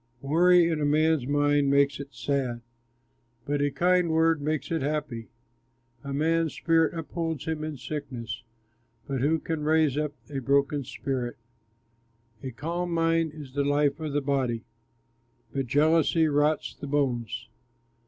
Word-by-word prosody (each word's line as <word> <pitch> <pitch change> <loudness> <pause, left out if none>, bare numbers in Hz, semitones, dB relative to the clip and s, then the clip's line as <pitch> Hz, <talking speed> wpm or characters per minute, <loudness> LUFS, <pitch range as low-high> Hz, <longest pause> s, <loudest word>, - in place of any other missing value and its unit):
Worry 175 +4 +5
in 160 -2 -1
a - - +1
man's 155 -2 +2
mind 145 0 +2
makes 140 -1 +3
it 140 0 -8
sad, 130 -4 -1 0.8
But 145 0 -1
a 145 - +2
kind 175 +4 +2
word 160 -1 +3
makes 155 +2 -2
it 165 -2 0
happy. 135 -6 -3 0.7
A 140 - -6
man's 160 +3 +1
spirit 165 0 +2
upholds 165 -2 -3
him 160 -2 -2
in 155 -2 -4
sickness, 125 -6 -5 0.6
But 135 -3 -3
who 155 +4 +3
can 160 -1 -4
raise 155 -2 +2
up 150 -1 -2
a 140 -2 -4
broken 140 +2 +1
spirit? 125 -1 -3 1.0
A 130 - -5
calm 170 +8 -3
mind 165 -1 +1
is 145 -4 -10
the 140 0 +1
life 145 +1 +1
of 155 -2 -4
the 145 - +1
body, 130 -5 -1 0.9
But 135 -2 -2
jealousy 160 +4 +3
rots 150 +1 +1
the 145 - -8
bones. 120 -5 -1
145 Hz, 145 wpm, -27 LUFS, 140-160 Hz, 1.0 s, Worry